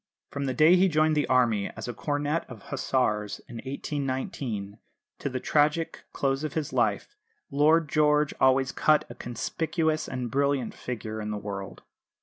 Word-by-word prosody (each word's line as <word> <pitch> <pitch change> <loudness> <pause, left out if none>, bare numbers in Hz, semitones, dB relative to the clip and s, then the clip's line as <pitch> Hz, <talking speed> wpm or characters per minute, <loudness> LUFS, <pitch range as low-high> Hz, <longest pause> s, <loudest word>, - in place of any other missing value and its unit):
From 140 0 -3
the 130 -2 -1
day 155 +4 +6
he 190 +2 +5
joined 155 -2 +3
the 150 - +1
Army 115 -6 +2
as 110 - -5
a 120 - -3
cornet 145 +4 -1
of 115 -6 -10
Hussars 105 -6 0
in 120 - -8
1819, 130 -6 -4 0.4
to - - -2
the 130 -1 -3
tragic 150 +4 +1
close 135 +1 0
of 155 - -3
his 155 -3 -2
life, 415 - 0 0.4
Lord 155 +3 +4
George 150 0 +3
always 130 0 +4
cut 155 -1 +3
a - - -6
conspicuous 155 +6 -2
and 125 -3 -4
brilliant 140 -2 +1
figure 110 -3 -5
in 105 - -4
the 105 - -2
world. 100 -2 -6
135 Hz, 160 wpm, -27 LUFS, 120-150 Hz, 0.4 s, day